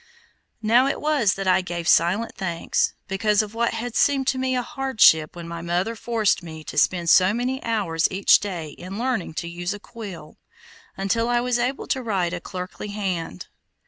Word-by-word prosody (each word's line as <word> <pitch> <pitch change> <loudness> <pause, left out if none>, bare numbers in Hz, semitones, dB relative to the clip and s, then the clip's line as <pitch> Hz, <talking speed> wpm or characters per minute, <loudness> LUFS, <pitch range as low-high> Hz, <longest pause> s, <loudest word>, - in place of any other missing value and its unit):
Now 240 +5 +4
it 275 - -1
was 290 -10 +2
that 195 -1 -4
I 185 - +4
gave 175 -2 -5
silent 185 +9 +3
thanks, 175 -3 -1
because 210 +2 +2
of 210 0 -9
what 230 0 0
had 230 +1 -5
seemed 275 -2 +3
to 260 - -1
me 260 0 0
a 250 - 0
hardship 220 - +3
when 170 -1 -8
my 170 0 -6
mother 175 +6 -1
forced 225 -4 0
me 160 -2 -9
to 150 - -8
spend 175 +2 +1
so 185 +4 +5
many 255 +2 -2
hours 195 -8 0
each 190 +1 +4
day 175 -6 -5
in 185 +6 -9
learning 235 -9 -2
to 170 - -3
use 175 +3 -4
a - - -10
quill, 210 -5 -10 0.6
until 230 +5 0
I 240 0 +2
was 245 0 0
able 250 +3 -1
to 265 - -1
write 190 -7 -1
a 180 - -4
clerkly 180 +3 -7
hand. 185 - -4
200 Hz, 190 wpm, -23 LUFS, 175-235 Hz, 0.6 s, so